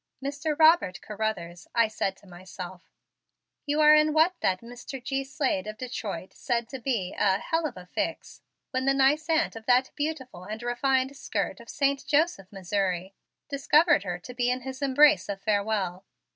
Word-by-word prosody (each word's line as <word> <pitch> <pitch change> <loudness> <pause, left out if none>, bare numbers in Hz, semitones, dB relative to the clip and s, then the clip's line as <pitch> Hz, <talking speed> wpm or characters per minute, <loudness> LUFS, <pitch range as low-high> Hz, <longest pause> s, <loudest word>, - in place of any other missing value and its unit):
"Mr. 290 +2 -3
Robert 315 - +5
Carruthers," 210 -6 -4
I 230 -1 +4
said 195 -3 -2
to - - -21
myself, 180 -1 -10 0.8
"you 295 +1 +1
are 300 0 +8
in 305 0 +4
what 320 +4 +4
that 185 -1 0
Mr. 245 +3 -8
G. 270 +1 -1
Slade 265 - -1
of 215 0 -6
Detroit 215 -8 -5
said 235 -2 -2
to 265 - -6
be 225 -7 -2
a 195 -2 +3
'hell 325 - -1
of 250 - -10
a 180 - -10
fix' 180 - -4 0.3
when 260 0 -1
the 275 0 +3
nice 290 +4 +3
aunt 325 -4 +2
of 225 0 -10
that 255 +1 +3
beautiful 275 - -4
and 215 +3 -6
refined 260 +2 +1
'skirt' - - -3
of - - -14
Saint 280 -1 0
Joseph, 295 - +1
Missouri, 190 -1 -2 0.3
discovered 295 - +4
her 180 -3 -4
to 215 +8 -10
be 245 0 0
in 250 +1 -1
his 260 +1 -7
embrace 285 +1 +4
of 200 -1 -3
farewell. 200 -3 -1
245 Hz, 175 wpm, -27 LUFS, 195-280 Hz, 0.8 s, are